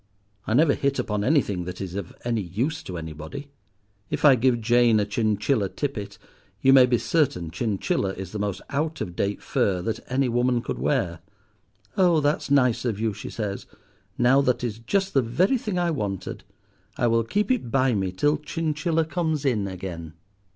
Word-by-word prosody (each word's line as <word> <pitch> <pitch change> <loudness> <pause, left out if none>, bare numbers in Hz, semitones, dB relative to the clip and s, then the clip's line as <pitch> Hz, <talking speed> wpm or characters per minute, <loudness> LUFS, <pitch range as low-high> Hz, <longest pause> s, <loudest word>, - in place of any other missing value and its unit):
I 110 - +1
never 150 +1 +5
hit 140 0 0
upon 105 -5 -1
anything 105 - +1
that 90 0 -6
is 95 -2 -5
of 100 -2 -6
any 115 -2 0
use 120 - -2
to 90 - -7
anybody. 80 - -7 0.6
If - - -1
I 145 - +9
give 125 -1 +2
Jane 120 -1 +4
a 105 - +1
chinchilla 105 +1 0
tippet, 105 -8 -4 0.4
you 135 - +5
may 130 -2 +8
be 125 -1 +2
certain 110 - 0
chinchilla 100 -1 -1
is 95 -1 -7
the 105 - -5
most 100 -2 -3
out 155 +3 -1
of 90 - -5
date 100 +2 -2
fur 95 -2 +1
that 110 - -2
any 135 +1 +2
woman 120 0 +1
could - - -4
wear. 85 -1 0 0.8
'Oh! 175 -4 +4
that 145 +1 +1
is - - -7
nice 125 -4 +3
of 115 -5 -2
you,' 110 -1 0
she - - -8
says; 100 -3 -4 0.5
'now 125 +3 +5
that 125 -3 0
is 115 -2 -3
just 195 - -1
the 135 - +4
very 180 - +1
thing 210 -5 -3
I 175 -1 +1
wanted. 100 - -4 0.5
I - - +1
will 115 0 +3
keep 205 - 0
it 240 - 0
by 130 +1 +2
me 95 -3 -1
till 145 +11 +1
chinchilla 160 +1 -1
comes 160 -3 -1
in 110 -7 +1
again. 85 -4 -7
120 Hz, 185 wpm, -25 LUFS, 100-145 Hz, 0.8 s, I